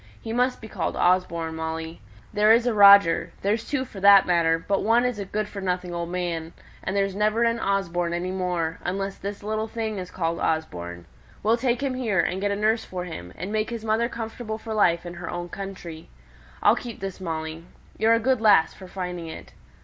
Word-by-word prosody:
He 225 Hz, -, -6 dB
must 250 Hz, +1 st, +1 dB
be 220 Hz, -, -8 dB
called -, -, -3 dB
Osborne, 170 Hz, -3 st, +1 dB
Molly. 160 Hz, -1 st, -5 dB, 0.3 s
There 210 Hz, +1 st, +5 dB
is 235 Hz, +1 st, +3 dB
a 245 Hz, -, +2 dB
Roger 200 Hz, -4 st, +7 dB
there's 215 Hz, +3 st, 0 dB
two 270 Hz, -3 st, -1 dB
for 205 Hz, -, -10 dB
that 200 Hz, 0 st, +7 dB
matter; 165 Hz, -2 st, +3 dB
but 195 Hz, +4 st, -1 dB
one 230 Hz, +3 st, +3 dB
is 250 Hz, -4 st, -1 dB
a 200 Hz, -, -3 dB
good 210 Hz, +2 st, -2 dB
for 200 Hz, -1 st, -7 dB
nothing 180 Hz, -1 st, -2 dB
old 170 Hz, 0 st, -3 dB
man; 170 Hz, -2 st, -3 dB, 0.3 s
and 190 Hz, -, -2 dB
there's 195 Hz, -1 st, +1 dB
never 215 Hz, +3 st, +1 dB
an 230 Hz, 0 st, +1 dB
Osborne 175 Hz, -4 st, 0 dB
any 175 Hz, +2 st, -2 dB
more, 180 Hz, -3 st, -2 dB
unless 195 Hz, +2 st, -3 dB
this 200 Hz, +1 st, -6 dB
little 215 Hz, +1 st, -2 dB
thing 220 Hz, -2 st, -3 dB
is 180 Hz, -1 st, -6 dB
called 170 Hz, -2 st, -2 dB
Osborne; 85 Hz, -, -3 dB, 0.4 s
we'll 225 Hz, +3 st, +3 dB
have 240 Hz, 0 st, 0 dB
him 275 Hz, -2 st, -1 dB
here, 230 Hz, -7 st, 0 dB
and 180 Hz, +3 st, 0 dB
get 205 Hz, -, +1 dB
a 200 Hz, -, 0 dB
nurse 220 Hz, +2 st, +1 dB
for 180 Hz, -1 st, -5 dB
him; 90 Hz, -, -8 dB
and 185 Hz, +3 st, -5 dB
make 215 Hz, 0 st, 0 dB
his 230 Hz, -2 st, -6 dB
mother 225 Hz, +2 st, +1 dB
comfortable 225 Hz, -1 st, -5 dB
for 220 Hz, 0 st, -6 dB
life 175 Hz, -5 st, +2 dB
in 175 Hz, -, -6 dB
her 175 Hz, -1 st, -7 dB
own 175 Hz, 0 st, -5 dB
country. 175 Hz, -4 st, -8 dB, 0.5 s
I'll 210 Hz, -, +6 dB
keep 240 Hz, -2 st, -7 dB
this, 195 Hz, 0 st, -6 dB
Molly. 160 Hz, -2 st, -4 dB, 0.4 s
You're 225 Hz, +1 st, +5 dB
a -, -, +1 dB
good 255 Hz, 0 st, +1 dB
lass 210 Hz, -7 st, +5 dB
for 190 Hz, -, -12 dB
finding 180 Hz, -2 st, -5 dB
it. 160 Hz, -, -10 dB
195 Hz, 210 wpm, -25 LUFS, 170-220 Hz, 0.5 s, Roger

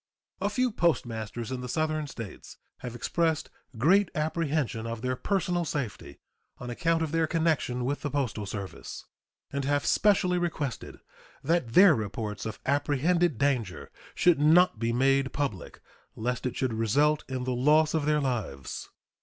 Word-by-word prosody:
A 200 Hz, -, +1 dB
few 250 Hz, +3 st, +1 dB
postmasters 120 Hz, -, -1 dB
in 130 Hz, -1 st, -3 dB
the 125 Hz, -, -6 dB
Southern 155 Hz, +1 st, -1 dB
States 115 Hz, -7 st, -9 dB, 0.2 s
have 120 Hz, -2 st, -7 dB
expressed 160 Hz, +5 st, 0 dB, 0.3 s
great 180 Hz, -, +4 dB
apprehension 155 Hz, -7 st, -1 dB
of 115 Hz, 0 st, -5 dB
their 130 Hz, 0 st, 0 dB
personal 175 Hz, +2 st, 0 dB
safety 140 Hz, -8 st, -4 dB, 0.4 s
on 125 Hz, 0 st, -6 dB
account 165 Hz, +6 st, +1 dB
of 155 Hz, -, -3 dB
their 165 Hz, 0 st, +1 dB
connection 155 Hz, -7 st, 0 dB
with 140 Hz, +3 st, -2 dB
the 145 Hz, -, -2 dB
postal 125 Hz, -7 st, -2 dB
service, 100 Hz, -2 st, -7 dB, 0.5 s
and 140 Hz, 0 st, -1 dB
have 145 Hz, +1 st, 0 dB
specially 180 Hz, -4 st, +3 dB
requested 150 Hz, -8 st, -4 dB, 0.4 s
that 155 Hz, -6 st, 0 dB
their 185 Hz, +1 st, +8 dB
reports 105 Hz, -2 st, -4 dB
of 110 Hz, -, -6 dB
apprehended 145 Hz, +3 st, +1 dB
danger 125 Hz, -9 st, -1 dB, 0.2 s
should 175 Hz, -4 st, +4 dB
not 160 Hz, -3 st, +5 dB
be 115 Hz, 0 st, 0 dB
made 135 Hz, +2 st, +2 dB
public 135 Hz, -11 st, -4 dB, 0.3 s
lest 125 Hz, +3 st, -2 dB
it 125 Hz, -, -5 dB
should 130 Hz, -3 st, -1 dB
result 140 Hz, +8 st, +2 dB
in 130 Hz, -1 st, -3 dB
the 130 Hz, 0 st, -1 dB
loss 150 Hz, +5 st, +3 dB
of 155 Hz, -3 st, 0 dB
their 150 Hz, 0 st, +2 dB
lives. 115 Hz, -, -3 dB
140 Hz, 155 wpm, -28 LUFS, 120-160 Hz, 0.5 s, their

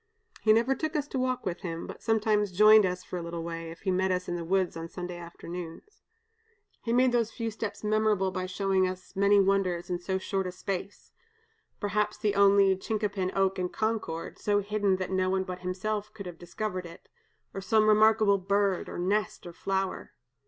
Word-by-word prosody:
He 215 Hz, -, +4 dB
never 230 Hz, +4 st, +4 dB
took 315 Hz, +3 st, -3 dB
us 295 Hz, -1 st, 0 dB
to 265 Hz, -, -2 dB
walk 255 Hz, -1 st, -1 dB
with 180 Hz, -1 st, -2 dB
him, 165 Hz, -3 st, -5 dB
but -, -, -9 dB
sometimes 215 Hz, -2 st, +1 dB
joined 215 Hz, +2 st, +7 dB
us 180 Hz, 0 st, -4 dB
for 180 Hz, -, -6 dB
a -, -, -5 dB
little 170 Hz, 0 st, -5 dB
way, 165 Hz, 0 st, -5 dB
if 165 Hz, -, -11 dB
he 190 Hz, -, 0 dB
met 190 Hz, +1 st, +1 dB
us 180 Hz, 0 st, -1 dB
in 175 Hz, -, -2 dB
the 170 Hz, -, -4 dB
woods 185 Hz, +1 st, 0 dB
on 165 Hz, 0 st, -5 dB
Sunday 180 Hz, 0 st, -6 dB
afternoons. 175 Hz, -, -9 dB, 0.8 s
He 230 Hz, -, -3 dB
made 250 Hz, +1 st, +4 dB
those 235 Hz, -2 st, +1 dB
few 230 Hz, -2 st, -3 dB
steps 220 Hz, 0 st, -5 dB
memorable 210 Hz, -3 st, +2 dB
by 185 Hz, 0 st, -3 dB
showing 190 Hz, 0 st, +1 dB
us 185 Hz, +2 st, -8 dB
many 200 Hz, +1 st, +4 dB
wonders 190 Hz, -3 st, +1 dB
in 175 Hz, -, -1 dB
so 190 Hz, +2 st, -2 dB
short 190 Hz, 0 st, -2 dB
a -, -, -4 dB
space: 195 Hz, +1 st, -6 dB, 0.7 s
perhaps 210 Hz, 0 st, -1 dB
the 210 Hz, -1 st, 0 dB
only 200 Hz, -1 st, +5 dB
chincapin 200 Hz, -1 st, -2 dB
oak 195 Hz, -1 st, +1 dB
in 180 Hz, -1 st, -1 dB
Concord, 215 Hz, -7 st, -3 dB
so 205 Hz, -1 st, +1 dB
hidden 205 Hz, -1 st, +1 dB
that 185 Hz, 0 st, -4 dB
no 185 Hz, 0 st, +1 dB
one 190 Hz, 0 st, +1 dB
but 185 Hz, -1 st, -6 dB
himself 205 Hz, +3 st, -3 dB
could 200 Hz, -2 st, -8 dB
have 175 Hz, -2 st, -8 dB
discovered 180 Hz, +1 st, -4 dB
it 170 Hz, +1 st, -14 dB, 0.5 s
or 195 Hz, -, -5 dB
some 215 Hz, +3 st, +3 dB
remarkable 215 Hz, -1 st, +5 dB
bird, 200 Hz, 0 st, 0 dB
or -, -, -6 dB
nest, 200 Hz, +4 st, -1 dB
or 175 Hz, -, -8 dB
flower. 190 Hz, +1 st, -3 dB
195 Hz, 200 wpm, -28 LUFS, 180-215 Hz, 0.8 s, joined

